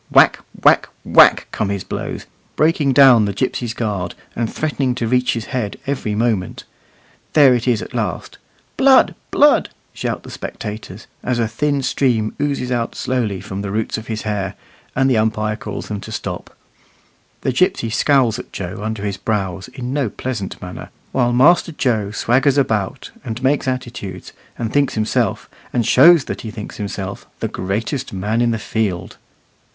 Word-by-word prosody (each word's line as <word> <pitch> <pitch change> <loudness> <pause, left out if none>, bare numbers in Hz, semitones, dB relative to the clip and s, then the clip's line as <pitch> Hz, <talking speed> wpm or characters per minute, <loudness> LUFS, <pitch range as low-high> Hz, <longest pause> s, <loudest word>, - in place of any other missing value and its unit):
Whack, - - +5 0.2
whack, - - +5 0.2
whack, - - +6
come 100 - -1
his 100 -2 -2
blows, - - -5 0.3
breaking 155 -3 +2
down 130 -5 +7
the 100 - -2
gipsy's 120 +1 -2
guard, 100 -6 -2 0.2
and 115 -2 -1
threatening 140 -5 -1
to 125 - -2
reach 125 +1 +2
his 115 -2 -4
head 115 -6 -2
every 130 -7 -2
moment. 110 -5 -1 0.7
There 140 -4 +7
it 120 0 -1
is 120 -4 +2
at - - -10
last. - - -3 0.4
"Blood, 265 -1 +6 0.2
blood!" 295 0 +4 0.2
shout - - -3
the - - -10
spectators, 105 -2 -7 0.2
as 125 -1 0
a 115 -1 +1
thin 140 +5 -1
stream 120 -5 +1
oozes 140 -3 -1
out 120 -2 -1
slowly 115 -7 -1
from 95 +1 -5
the 100 - -4
roots 110 +2 -1
of 110 - -6
his 110 -1 -4
hair, 100 -3 -2 0.4
and 135 +1 +3
the 130 -4 +3
umpire 110 0 0
calls - - -6
to - - -13
them 100 - -4
to 110 - -9
stop. 95 -5 -6 0.8
The 130 - 0
gipsy 180 - +1
scowls 125 -1 +3
at - - -9
Joe 90 +1 -5
under 110 -1 -3
his 100 -1 -2
brows 95 -2 -2
in 125 0 -6
no 140 -5 0
pleasant 110 -4 -5
manner, 90 -2 -8 0.2
while 120 -2 +2
Master 165 +8 +4
Joe 115 -9 0
swaggers 130 +6 +2
about, 110 -8 -1
and 115 +3 -5
makes 135 +1 +2
attitudes, 120 -8 -5 0.2
and 115 -2 -3
thinks 145 -1 +2
himself, 110 0 0 0.2
and 120 -2 0
shows 160 +5 +7
that - - -5
he 110 - -6
thinks 105 -1 -8
himself, 100 -2 -5
the - - -1
greatest 115 +8 -3
man 105 +5 -1
in 120 - +3
the 115 - 0
field. 105 -4 -2
115 Hz, 170 wpm, -19 LUFS, 105-130 Hz, 0.8 s, down